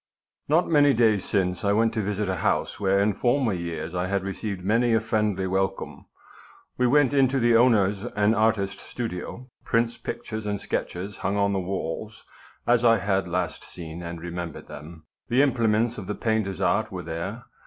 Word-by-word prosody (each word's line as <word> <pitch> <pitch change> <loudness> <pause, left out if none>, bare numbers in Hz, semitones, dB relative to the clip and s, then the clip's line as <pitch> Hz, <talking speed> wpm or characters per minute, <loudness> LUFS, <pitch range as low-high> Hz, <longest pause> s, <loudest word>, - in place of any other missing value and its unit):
Not 160 +5 +3
many 145 -4 +5
days 110 -4 +3
since 90 -3 0
I 100 0 +2
went 115 +2 +2
to 110 - 0
visit 105 0 -2
a 95 -1 -1
house - - 0
where 100 -1 +2
in 100 +1 +2
former 120 0 +1
years 85 -2 -4
I 90 0 -1
had 100 0 -1
received 100 -1 -4
many 115 +3 +3
a - - +4
friendly 105 -3 0
welcome. 95 +1 -2 0.7
We 125 - +2
went 145 +1 +4
into 135 -1 +3
the 120 -1 +4
owner's 105 -5 +4
(an 105 -2 +1
artist's) 105 -3 +1
studio. 120 +3 -6
Prints, 115 0 0
pictures, 110 -1 -5
and 100 -1 -1
sketches 95 +3 -4
hung 100 +2 -1
on 100 0 +2
the 95 - 0
walls 95 +3 -5 0.4
as 120 0 +3
I 115 -1 +6
had 95 -1 0
last 85 -3 -2
seen 85 -1 -8
and 85 -1 -6
remembered 85 -1 -6
them. 80 +2 -10 0.2
The 130 +4 +4
implements 115 -3 +1
of 95 - -8
the 105 - -3
painter's 110 -4 -1
art 100 +3 +1
were 90 -2 -5
there. 85 +9 -5
105 Hz, 180 wpm, -25 LUFS, 95-115 Hz, 0.7 s, I